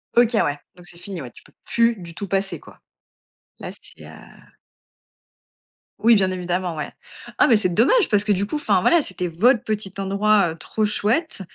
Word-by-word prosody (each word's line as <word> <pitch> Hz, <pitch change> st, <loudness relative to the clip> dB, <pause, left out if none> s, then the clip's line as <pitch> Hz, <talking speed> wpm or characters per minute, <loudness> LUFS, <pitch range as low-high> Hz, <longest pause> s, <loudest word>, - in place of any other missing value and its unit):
OK, 240 Hz, 0 st, +4 dB
ouais, 145 Hz, 0 st, -1 dB, 0.2 s
donc 180 Hz, -1 st, -14 dB
c'est 175 Hz, -, -7 dB
fini, 180 Hz, 0 st, -6 dB
ouais, 125 Hz, -3 st, -9 dB
tu -, -, -17 dB
peux -, -, -22 dB
plus 235 Hz, 0 st, +2 dB
du 170 Hz, -3 st, -11 dB
tout 200 Hz, -, -6 dB
passer, 195 Hz, +1 st, -1 dB
quoi. -, -, -17 dB, 0.8 s
Là, -, -, -6 dB
c'est -, -, -12 dB
heu -, -, -10 dB, 1.9 s
Oui, 235 Hz, +1 st, +5 dB
bien 190 Hz, -2 st, +3 dB
évidemment, 180 Hz, -1 st, -2 dB
ouais. 150 Hz, -, -5 dB, 0.5 s
Ah, -, -, +6 dB
mais 230 Hz, -, +5 dB
c'est 200 Hz, -3 st, +1 dB
dommage 335 Hz, -, +3 dB
parce 205 Hz, -2 st, +3 dB
que 210 Hz, -, 0 dB
du 200 Hz, +1 st, +1 dB
coup 300 Hz, -, -3 dB
enfin 200 Hz, -10 st, +1 dB
voilà 340 Hz, -, +4 dB
c'était 185 Hz, -6 st, -3 dB
votre 215 Hz, +8 st, +2 dB
petit 210 Hz, -3 st, -3 dB
endroit, 200 Hz, -1 st, +2 dB
heu, -, -, -8 dB
trop 215 Hz, +5 st, -2 dB
chouette 215 Hz, -, 0 dB
200 Hz, 190 wpm, -22 LUFS, 180-220 Hz, 1.9 s, Ah